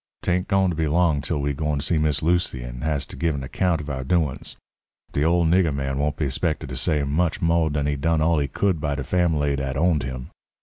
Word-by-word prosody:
'Tain't 90 +1 0
goin' 95 -2 +2
to - - -4
be 80 0 0
long 80 -2 +2
till 75 +3 -2
we 70 0 -1
gwine 75 +1 -1
to 70 - -2
see 80 -2 +2
Miss 75 -1 +1
Lucy 85 -7 +1
and - - -7
has 75 -3 0
to - - -11
give 80 -2 0
an 70 - -4
account 85 +5 0
of 75 - -7
our 65 -3 -3
doin's. 75 -1 0 0.5
De 70 - 0
ole 85 +1 +3
nigger 85 0 +3
man 70 -1 -2
won't 75 +1 -1
be 75 -4 0
'spected 65 0 -1
to 65 - -5
say 75 +4 +1
much 80 +4 0
mo' 85 -1 +2
dan 75 -1 -1
he 75 0 0
done 80 +3 +1
all 80 0 +2
he 70 - 0
could 85 +3 0
by 75 -1 -1
de 70 - -3
fambly 75 -3 +1
dat 70 -1 -3
owned 80 -1 +2
him. 65 -1 -6
75 Hz, 250 wpm, -23 LUFS, 70-85 Hz, 0.5 s, ole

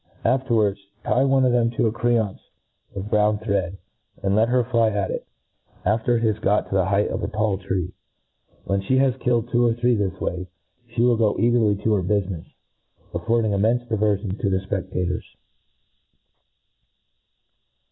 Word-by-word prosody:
Afterwards, 115 -7 +2 0.2
tie 130 - +2
one 135 -1 +3
of 125 - +3
them 120 -1 +3
to - - +2
a 110 - +2
creancd 115 -3 0 0.6
of 100 +2 -6
brown 105 0 +3
thread, 100 -3 -2 0.5
and 100 0 +1
let 110 +2 +3
her 125 0 +3
fly 115 -2 +2
at 100 -2 -1
it, - - -5 0.6
after 110 +4 +2
it 115 - -2
has 110 -2 +1
got 105 +1 +1
to - - -5
the 95 -2 +3
height 100 +2 +1
of - - -3
a 100 - -2
tall 105 -2 -1
tree. 95 -2 -3 0.7
When 100 0 0
fhe 130 +7 +1
has 130 -2 +3
killed 120 -2 0
two 120 0 +3
or 115 -1 +2
three 120 +1 +2
this 100 -5 -1
way, 90 +1 -3 0.4
fhe 120 - -19
will 120 -2 +3
go 110 -2 +2
,cagerly 115 -4 +2
to 110 - +2
her 100 - +2
bufine&, 95 -2 -2 0.6
affording 115 -2 +1
immcnfe 115 +4 +1
diveriion 105 -2 0
to 100 - +1
the 95 - +1
fpedators. 90 -2 -2
105 Hz, 165 wpm, -23 LUFS, 100-120 Hz, 0.7 s, one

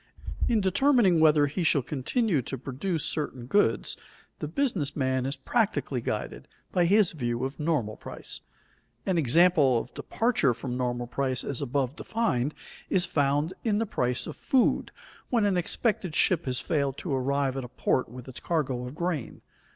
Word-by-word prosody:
In 225 -3 +2
determining 195 - +4
whether 155 -2 +5
he 150 +6 -3
shall 150 -5 +3
continue 150 - 0
to 135 +2 -5
produce 145 +7 -3
certain 130 -5 -2
goods, 130 - +1 0.4
the 150 - -3
business 175 - 0
man 130 -2 0
is 135 - -2
practically 150 - 0
guided - - -4 0.2
by 175 -1 +3
his 200 +1 +4
view 120 -4 -2
of 135 +3 -6
normal 150 -9 -1
price. - - -5 0.6
An 185 -3 +1
example 150 -2 +5
of 115 - -5
departure 225 - +1
from 125 +1 -5
normal 120 -1 -1
price 130 +1 -1
as 140 -1 -3
above 135 0 -1
defined, 155 - -1 0.3
is 185 -2 +2
found 145 +1 +1
in 215 -3 +1
the 225 - +1
price 125 - -1
of - - -7
food 260 -3 +1 0.4
when 230 -4 +2
an 200 -2 +2
expected 180 -1 0
ship 175 -3 +3
has 125 -2 0
failed 140 -6 -1
to 165 - -3
arrive 135 0 0
at 135 - -3
a - - -6
port 125 - 0
with 125 +1 -10
its 130 - -7
cargo 130 -7 -1
of 125 - -9
grain. 170 -6 -3
145 Hz, 165 wpm, -27 LUFS, 130-180 Hz, 0.6 s, whether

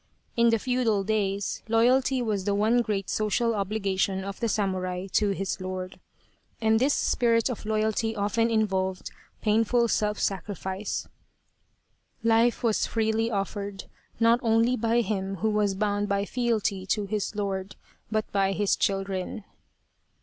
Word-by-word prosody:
In 235 0 +4
the 225 - +3
feudal 230 -4 +1
days 200 -2 -1
loyalty 250 +3 +3
was 205 -4 -1
the 200 - +1
one 220 +4 +3
great 205 -4 -2
social 230 +2 +1
obligation 195 -2 -1
of 200 0 -6
the 230 - 0
samurai 185 -3 -1
to 210 - +3
his 195 -1 -2
lord. 185 0 -5 0.6
And 220 0 +3
this 275 +4 +3
spirit 230 0 +2
of 220 -2 -7
loyalty 220 +1 0
often 220 +3 +1
involved 190 -4 0 0.3
painful 225 +3 +3
self 210 -1 0
sacrifice. 195 +1 -3 0.6
" - - -43
Life 235 +2 +3
was 225 -3 +2
freely 225 0 0
offered, 200 -1 -3 0.4
not 230 +1 +4
only 230 +1 +3
by 230 +1 +2
him 195 -3 -2
who 215 +4 0
was 210 -2 +1
bound 205 0 0
by 200 0 +1
fealty 220 -5 -1
to 210 +1 0
his 210 +1 -3
lord, 195 -1 -3 0.3
but 215 0 0
by 195 -1 +2
his 205 0 +1
children." 195 +1 -2
210 Hz, 140 wpm, -27 LUFS, 195-225 Hz, 0.6 s, In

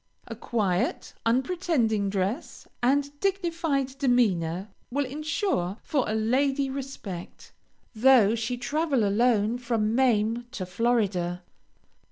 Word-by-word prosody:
A 230 - -7
quiet, 205 -6 -1
unpretending 245 - +1
dress, 200 - -3
and 280 +3 +2
dignified 335 -8 -1
demeanor, 200 - +1 0.2
will 280 +3 0
insure 285 - -2
for 275 -7 0
a 215 - 0
lady 270 +5 +1
respect, 255 -10 -7 0.4
though 230 -2 +5
she 235 +2 -2
travel 290 -1 0
alone 225 +1 +2
from 225 -3 0
Maine 235 -2 +2
to 185 - -4
Florida. 185 -4 0
240 Hz, 105 wpm, -27 LUFS, 210-275 Hz, 0.4 s, though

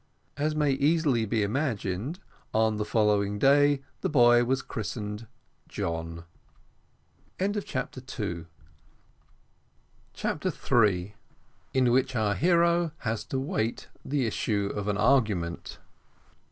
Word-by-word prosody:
As 150 +2 -1
may 150 -2 +2
easily 140 -4 +2
be 110 0 +1
imagined, 115 - -2 0.4
on 110 -1 +2
the 105 - -1
following 105 -2 +2
day 145 +3 +4 0.2
the - - -1
boy 120 -4 +6
was 130 +2 0
christened 105 +1 -5 0.4
John. 85 0 -4 1.2
CHAPTER 200 -8 -2 2.5
THREE. 100 -4 +1 0.6
IN 130 -2 +4
WHICH 130 +1 +2
OUR 110 -3 +1
HERO 170 - +3
HAS 115 -5 -3
TO 135 - -2
WAIT 135 - -2
THE 135 -2 0
ISSUE 100 -2 -1
OF 105 0 -4
AN 105 -1 0
ARGUMENT. 105 -8 +1
120 Hz, 100 wpm, -28 LUFS, 105-145 Hz, 2.5 s, boy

